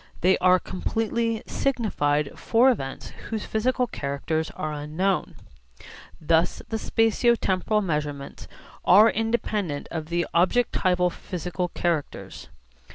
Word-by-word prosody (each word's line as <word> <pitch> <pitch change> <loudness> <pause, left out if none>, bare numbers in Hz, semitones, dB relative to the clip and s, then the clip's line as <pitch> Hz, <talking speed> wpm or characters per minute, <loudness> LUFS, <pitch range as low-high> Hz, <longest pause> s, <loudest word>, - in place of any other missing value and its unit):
They 185 +2 +4
are 185 0 +5
completely 225 +5 -2
signified 150 - 0
for 245 +3 +4
events 135 - -5 0.2
whose 220 -2 -3
physical 250 +3 0
characters 155 - -3
are 155 0 -3
unknown. 155 +6 -1 0.8
Thus 165 +2 +1
the 225 - -1
spatio 225 +2 +2
temporal 205 +3 +1
measurements 150 -5 -4 0.4
are 210 +5 +7
independent 215 -8 -2
of 160 -2 -4
the 170 +1 0
objectival 180 -2 +2
physical 180 +1 -4
characters. 170 -4 -3
185 Hz, 105 wpm, -25 LUFS, 155-225 Hz, 0.8 s, are